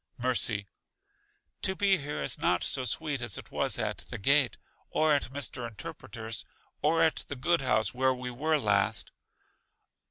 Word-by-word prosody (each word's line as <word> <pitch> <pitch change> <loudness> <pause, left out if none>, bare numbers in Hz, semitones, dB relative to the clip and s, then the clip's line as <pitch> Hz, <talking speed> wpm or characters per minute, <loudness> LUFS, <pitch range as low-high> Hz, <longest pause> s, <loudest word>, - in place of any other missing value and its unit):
Mercy: 120 -5 +1 1.0
To 190 - +1
be 195 -1 +4
here 145 - -4
is 70 - 0
not 90 - +2
so 130 -2 +1
sweet 140 +2 0
as 120 -4 -2
it - - -10
was - - +1
at - - -2
The - - -4
Gate, 140 +4 +3 0.3
or 155 -1 +3
at 140 -3 0
Mr. 135 -3 -3
Interpreter's, 115 -3 -7 0.4
or 165 +2 +3
at 160 - +3
the 140 - -4
good 170 +5 +1
house 110 -5 +1
where 130 +1 +3
we 125 -1 -4
were 155 +6 +1
last. 100 -7 +1
130 Hz, 160 wpm, -30 LUFS, 115-150 Hz, 1.0 s, be